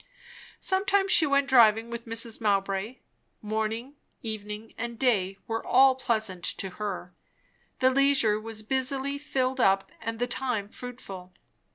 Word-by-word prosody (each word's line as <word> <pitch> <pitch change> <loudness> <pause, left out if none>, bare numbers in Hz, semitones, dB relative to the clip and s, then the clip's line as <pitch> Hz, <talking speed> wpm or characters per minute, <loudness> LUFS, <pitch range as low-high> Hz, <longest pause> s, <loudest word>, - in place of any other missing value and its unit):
Sometimes 390 0 +1
she 315 - +5
went 280 0 +2
driving 230 -3 +5
with 235 0 -6
Mrs. 230 0 -3
Mowbray. 200 +2 0 0.4
Morning, 220 +5 -3 0.3
evening, 215 0 -6
and 235 0 -5
day 195 -7 +1
were 225 0 -3
all 265 +1 +6
pleasant 220 -8 -2
to 190 - -2
her; 185 -3 -4 0.6
the 260 0 +4
leisure 270 -6 +3
was 220 0 -5
busily 265 +3 -1
filled 260 -2 -1
up, 195 -4 +3
and 225 0 -4
the 245 - 0
time 240 -4 -2
fruitful. 195 -8 -9
230 Hz, 135 wpm, -27 LUFS, 210-260 Hz, 0.6 s, all